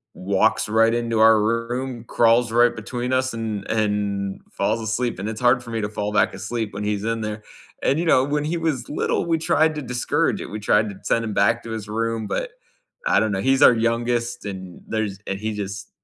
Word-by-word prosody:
walks 100 Hz, +3 st, +1 dB
right 115 Hz, +1 st, +4 dB
into 115 Hz, -2 st, 0 dB
our 110 Hz, -1 st, +6 dB
room, 115 Hz, +2 st, -2 dB
crawls 115 Hz, 0 st, +3 dB
right 120 Hz, +1 st, +4 dB
between 120 Hz, +3 st, -4 dB
us, 130 Hz, -1 st, +1 dB
and 110 Hz, -3 st, -4 dB
and 105 Hz, -2 st, -1 dB
falls 110 Hz, +3 st, 0 dB
asleep, 115 Hz, +2 st, -2 dB
and 100 Hz, +3 st, -4 dB
it's 110 Hz, +2 st, -5 dB
hard 125 Hz, 0 st, +3 dB
for 120 Hz, -, -9 dB
me 115 Hz, -1 st, -2 dB
to 105 Hz, -, -2 dB
fall 105 Hz, 0 st, -3 dB
back -, -, +2 dB
asleep 115 Hz, -3 st, -4 dB
when 100 Hz, +1 st, -5 dB
he's 105 Hz, -1 st, -1 dB
in 115 Hz, 0 st, -1 dB
there. 105 Hz, 0 st, -4 dB, 0.4 s
And, 140 Hz, -, +2 dB
you 175 Hz, -, -1 dB
know, 130 Hz, -5 st, +4 dB
when 145 Hz, +1 st, -1 dB
he 170 Hz, +2 st, -1 dB
was 155 Hz, -7 st, -2 dB
little, 150 Hz, -, -1 dB
we 165 Hz, -1 st, +1 dB
tried 160 Hz, 0 st, +2 dB
to 150 Hz, -, -3 dB
discourage 145 Hz, +9 st, 0 dB
it, -, -, -6 dB
we 105 Hz, -, -4 dB
tried 105 Hz, +1 st, +2 dB
to 95 Hz, -, -12 dB
send 115 Hz, 0 st, +1 dB
him 105 Hz, -, -3 dB
back 110 Hz, +4 st, +2 dB
to 115 Hz, -, -7 dB
his 110 Hz, -2 st, -5 dB
room, 115 Hz, 0 st, -2 dB
but -, -, -3 dB, 0.6 s
I -, -, +4 dB
don't 110 Hz, -1 st, +1 dB
know, 95 Hz, -1 st, -1 dB
he's 135 Hz, +2 st, +3 dB
our -, -, +9 dB
youngest, 120 Hz, 0 st, -1 dB
and 95 Hz, -3 st, -7 dB
there's 110 Hz, -3 st, -2 dB
and 95 Hz, 0 st, -3 dB
he 110 Hz, 0 st, -3 dB
just 100 Hz, -1 st, -5 dB
115 Hz, 220 wpm, -22 LUFS, 105-120 Hz, 0.6 s, our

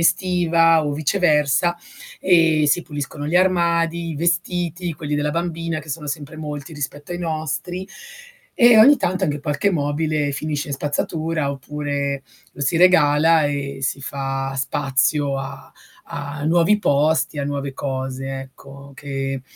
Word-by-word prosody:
estiva 165 Hz, -2 st, +3 dB
o 145 Hz, -, -1 dB
viceversa, 155 Hz, 0 st, +2 dB, 0.4 s
e 165 Hz, -4 st, +4 dB
si 175 Hz, +4 st, +2 dB
puliscono 145 Hz, -1 st, -6 dB
gli 165 Hz, +4 st, +1 dB
armadi, 170 Hz, -2 st, +2 dB
i 155 Hz, -, -5 dB
vestiti, 175 Hz, +1 st, -1 dB
quelli 150 Hz, 0 st, -4 dB
della 145 Hz, 0 st, 0 dB
bambina 165 Hz, 0 st, -2 dB
che 155 Hz, -, -15 dB
sono 150 Hz, +1 st, -5 dB
sempre 145 Hz, +1 st, -5 dB
molti 150 Hz, 0 st, -6 dB
rispetto 145 Hz, +1 st, -6 dB
ai 175 Hz, -, -4 dB
nostri, 170 Hz, +2 st, -3 dB, 0.7 s
e 240 Hz, -1 st, +8 dB
ogni 280 Hz, +7 st, +8 dB
tanto 185 Hz, -5 st, -1 dB
anche 150 Hz, -4 st, -1 dB
qualche 145 Hz, +7 st, 0 dB
mobile 150 Hz, -2 st, -1 dB
finisce 150 Hz, 0 st, -3 dB
in 140 Hz, -, -2 dB
spazzatura, 155 Hz, +2 st, -2 dB
oppure 140 Hz, 0 st, -3 dB, 0.3 s
lo -, -, -11 dB
si 140 Hz, +4 st, +1 dB
regala 165 Hz, -2 st, +5 dB
e 140 Hz, -1 st, -3 dB
si 135 Hz, +1 st, -1 dB
fa 135 Hz, 0 st, -3 dB
spazio 135 Hz, +1 st, 0 dB
a 135 Hz, 0 st, -8 dB, 0.4 s
a 145 Hz, 0 st, -6 dB
nuovi 170 Hz, +6 st, +3 dB
posti, 155 Hz, -2 st, +1 dB
a 140 Hz, -, -1 dB
nuove 140 Hz, -1 st, -4 dB
cose, 135 Hz, 0 st, -4 dB
ecco, 140 Hz, +1 st, -13 dB
che 135 Hz, -1 st, -4 dB
150 Hz, 140 wpm, -21 LUFS, 140-170 Hz, 0.7 s, e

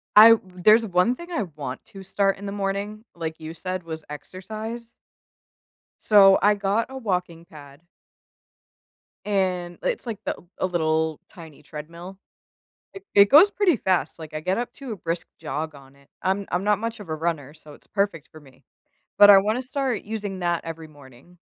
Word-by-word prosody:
I 225 Hz, +2 st, +10 dB
there's 200 Hz, +5 st, +3 dB
one 185 Hz, +5 st, +2 dB
thing 345 Hz, +5 st, -11 dB
I 235 Hz, -11 st, -1 dB
want 135 Hz, -3 st, -6 dB
to 195 Hz, -3 st, -11 dB
start 195 Hz, +1 st, 0 dB
in 200 Hz, -, -9 dB
the 200 Hz, -, -4 dB
morning, 200 Hz, +2 st, -3 dB
like 160 Hz, -2 st, -5 dB
you 160 Hz, 0 st, -7 dB
said, 185 Hz, +1 st, -5 dB
was 160 Hz, -1 st, -7 dB
exercise. 215 Hz, +9 st, -8 dB, 1.0 s
So, 195 Hz, -2 st, +6 dB
I 210 Hz, +1 st, +5 dB
got 205 Hz, +3 st, 0 dB
a 265 Hz, -, -8 dB
walking 180 Hz, -7 st, -3 dB
pad 145 Hz, -2 st, -14 dB, 1.4 s
and 185 Hz, -4 st, -1 dB
it's 485 Hz, -, -2 dB
like 220 Hz, -3 st, -4 dB
the -, -, -1 dB, 0.2 s
a -, -, +1 dB
little, 160 Hz, -3 st, 0 dB
tiny 160 Hz, -4 st, -13 dB
treadmill. 170 Hz, +5 st, -9 dB, 0.8 s
It 390 Hz, 0 st, -10 dB
it 200 Hz, 0 st, +7 dB
goes 340 Hz, +9 st, +8 dB
pretty 380 Hz, -, +2 dB
fast, 185 Hz, -4 st, 0 dB
like, 160 Hz, -1 st, -10 dB
I 155 Hz, -, -3 dB
get 185 Hz, +3 st, -1 dB
up 240 Hz, +1 st, -4 dB
to 270 Hz, -4 st, -8 dB
a -, -, -3 dB
brisk 165 Hz, 0 st, -4 dB
jog 155 Hz, +2 st, -4 dB
on 135 Hz, -1 st, -16 dB
it, 140 Hz, 0 st, -25 dB
I'm 195 Hz, +2 st, 0 dB
I'm 180 Hz, +2 st, 0 dB
not 210 Hz, 0 st, +2 dB
much 230 Hz, 0 st, -4 dB
of 200 Hz, -, -11 dB
a 155 Hz, -, -2 dB
runner, 155 Hz, -3 st, -3 dB
so 155 Hz, -2 st, -14 dB
it's -, -, -19 dB
perfect 195 Hz, -6 st, -2 dB
for 155 Hz, -, -13 dB
me. 135 Hz, -3 st, -20 dB, 0.6 s
But, 205 Hz, 0 st, +10 dB
I 195 Hz, -, +10 dB
wanna 215 Hz, +6 st, 0 dB
start 260 Hz, -3 st, -2 dB
using 205 Hz, -3 st, -5 dB
that 175 Hz, -1 st, -1 dB
every 165 Hz, -1 st, -7 dB
morning. 145 Hz, +3 st, -18 dB
185 Hz, 180 wpm, -24 LUFS, 160-215 Hz, 1.4 s, I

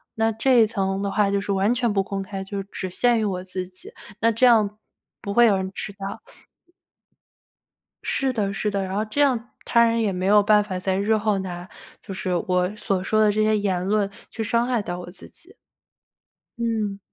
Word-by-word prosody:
那 225 Hz, 0 st, +2 dB
这 235 Hz, +2 st, +3 dB
一 220 Hz, -, +5 dB
层 195 Hz, -3 st, -2 dB
的 200 Hz, -1 st, -2 dB
话， 205 Hz, -1 st, +2 dB
就 200 Hz, 0 st, +1 dB
是 200 Hz, -, -3 dB
完 200 Hz, +4 st, +2 dB
全 240 Hz, -2 st, +1 dB
不 200 Hz, -1 st, +2 dB
公 195 Hz, 0 st, -4 dB
开， 195 Hz, 0 st, -6 dB
就 195 Hz, 0 st, -4 dB
只 190 Hz, -1 st, -6 dB
限 240 Hz, +5 st, +2 dB
于 215 Hz, -, 0 dB
我 185 Hz, -3 st, -2 dB
自 185 Hz, 0 st, -5 dB
己， 185 Hz, 0 st, -13 dB, 0.3 s
那 230 Hz, 0 st, +4 dB
这 230 Hz, +3 st, +3 dB
样， 215 Hz, -4 st, +4 dB, 0.4 s
不 200 Hz, -, -4 dB
会 240 Hz, +3 st, +6 dB
有 205 Hz, -4 st, +4 dB
人 190 Hz, 0 st, -3 dB
知 -, -, -5 dB
道。 195 Hz, 0 st, -6 dB, 1.8 s
是 270 Hz, -1 st, 0 dB
的 200 Hz, -4 st, -1 dB
是 210 Hz, +2 st, -1 dB
的。 200 Hz, -1 st, -1 dB
然 190 Hz, 0 st, -5 dB
后 210 Hz, -, +1 dB
这 220 Hz, +7 st, -1 dB
样 245 Hz, -4 st, +1 dB, 0.2 s
他 235 Hz, -, +4 dB
人 230 Hz, 0 st, +1 dB
也 210 Hz, -3 st, +1 dB
没 185 Hz, 0 st, -3 dB
有 205 Hz, +2 st, +6 dB
办 210 Hz, 0 st, +4 dB
法 190 Hz, -3 st, -4 dB
在 190 Hz, 0 st, -1 dB
日 210 Hz, +3 st, +2 dB
后 210 Hz, -1 st, +1 dB
拿 180 Hz, -1 st, -6 dB, 0.3 s
就 195 Hz, -, -8 dB
是 185 Hz, -1 st, -2 dB
我 180 Hz, +2 st, +1 dB
所 195 Hz, -3 st, -1 dB
说 215 Hz, +2 st, +2 dB
的 210 Hz, -1 st, +5 dB
这 215 Hz, +1 st, +1 dB
些 215 Hz, 0 st, +3 dB
言 190 Hz, -3 st, -1 dB
论 205 Hz, 0 st, +1 dB, 0.2 s
去 225 Hz, -, -4 dB
伤 235 Hz, +2 st, +1 dB
害 245 Hz, -3 st, +1 dB
到 175 Hz, -3 st, -5 dB
我 175 Hz, -, -8 dB
自 180 Hz, -, -13 dB
己。 375 Hz, +6 st, -15 dB, 1.0 s
嗯。 220 Hz, -4 st, -1 dB
205 Hz, 230 characters per minute, -23 LUFS, 195-225 Hz, 1.8 s, 会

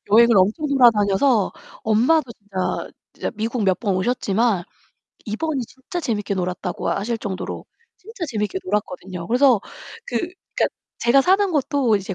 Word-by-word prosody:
여행을 235 Hz, +1 st, +6 dB
엄청 210 Hz, -, +2 dB
돌아다녀서 230 Hz, -3 st, +4 dB, 0.4 s
엄마도 255 Hz, +4 st, +3 dB
진짜 200 Hz, -4 st, -4 dB, 0.2 s
진짜 -, -, -4 dB
미국 225 Hz, +2 st, -2 dB
몇 190 Hz, -2 st, +2 dB
번 205 Hz, -5 st, 0 dB
오셨지만 210 Hz, -1 st, +1 dB, 0.6 s
이번이 270 Hz, +7 st, -2 dB
진짜 260 Hz, +9 st, -7 dB
재밌게 210 Hz, -8 st, -2 dB
놀았다고 180 Hz, 0 st, -3 dB
하실 225 Hz, +4 st, -1 dB
정도로 195 Hz, -3 st, -5 dB, 0.3 s
진짜 430 Hz, -1 st, -7 dB
재밌게 210 Hz, -4 st, -2 dB
놀았거든요. 185 Hz, -3 st, -3 dB
그래서 250 Hz, -2 st, +4 dB, 0.5 s
그 -, -, -3 dB
그러니까 365 Hz, +1 st, -2 dB, 0.3 s
제가 240 Hz, +4 st, +4 dB
사는 380 Hz, +5 st, +3 dB
곳도 280 Hz, -6 st, +2 dB
이제 195 Hz, 0 st, -5 dB
225 Hz, 335 characters per minute, -22 LUFS, 200-270 Hz, 0.6 s, 여행을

